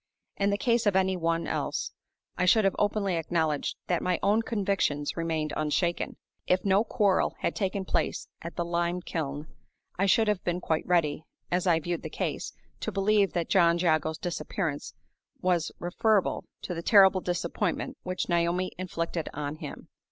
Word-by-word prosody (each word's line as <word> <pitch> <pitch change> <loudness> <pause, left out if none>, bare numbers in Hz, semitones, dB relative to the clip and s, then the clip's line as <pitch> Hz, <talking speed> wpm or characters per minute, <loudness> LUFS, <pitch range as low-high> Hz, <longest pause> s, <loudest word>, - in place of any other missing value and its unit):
In 200 0 +1
the 200 - +1
case 235 0 +2
of 200 - +3
any 190 0 +3
one 165 -1 0
else, - - -2 0.4
I 180 - +1
should 205 +4 +5
have 195 - +2
openly 205 -3 +1
acknowledged 160 -3 -1
that 175 - 0
my 180 -1 +1
own 210 +3 +4
convictions 195 -10 0
remained 160 -2 -1
unshaken. 160 +3 0 0.3
If 185 +2 +2
no 195 +2 +4
quarrel 205 -5 +2
had - - 0
taken 195 -1 -1
place - - -1
at 170 - -7
the 170 - -1
lime 170 +1 -1
kiln, 150 -3 -3 0.5
I 195 - +3
should 220 +3 +4
have 210 -3 0
been 175 0 -1
quite 160 -3 -1
ready, 160 -4 +2 0.3
as 180 +1 +1
I 165 -2 +4
viewed 170 +2 -3
the - - -6
case, - - -3 0.3
to - - -3
believe 200 0 +2
that 170 -2 -1
John 170 -3 +5
Jago's 160 -2 +1
disappearance 170 -3 -3 0.4
was 175 -3 +1
referable 195 +3 +1 0.2
to 180 - -3
the 165 - -4
terrible 190 0 +6
disappointment 175 -1 -2
which 185 0 -3
Naomi 175 +1 +1
had - - -7
inflicted 165 -1 -3
on 145 +1 -4
him. - - -8
175 Hz, 170 wpm, -28 LUFS, 165-195 Hz, 0.5 s, terrible